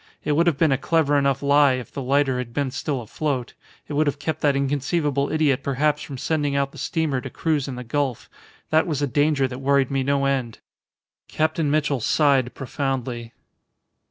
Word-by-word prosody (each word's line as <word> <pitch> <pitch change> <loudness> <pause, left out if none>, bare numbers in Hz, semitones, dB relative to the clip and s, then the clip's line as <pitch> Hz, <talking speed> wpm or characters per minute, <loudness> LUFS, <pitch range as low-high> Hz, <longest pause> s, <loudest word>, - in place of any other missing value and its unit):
It - - -1
would 165 +4 +3
have 160 -5 +2
been 160 -2 +3
a 135 - +1
clever 160 -3 +2
enough 140 -1 +1
lie 140 -1 +5
if 130 -1 -5
the 140 - -5
lighter 135 0 +1
had 120 -2 -6
been 140 -2 0
still 135 0 -3
afloat. 130 +1 -3 0.3
It - - -6
would 150 +1 +2
have 145 - 0
kept 155 +1 -3
that 145 -2 +3
inconceivable 140 +1 0
idiot 150 -4 +2
perhaps 145 +2 0
from 140 - -7
sending 145 0 -1
out 140 0 0
the - - -12
steamer 155 -6 -1
to - - -6
cruise 155 -4 -1
in 135 - -5
the 125 - -6
gulf. 135 0 -2 0.4
That 160 +3 +3
was 150 -4 -2
the - - +2
danger 145 0 +2
that 125 0 -7
worried 140 -1 +2
me 135 -1 +1
no 140 +1 +1
end." 130 -5 -1 0.7
Captain 155 -1 0
Mitchell 145 -2 +1
sighed 130 0 +2
profoundly. 130 -4 -3
140 Hz, 195 wpm, -23 LUFS, 130-150 Hz, 0.7 s, lie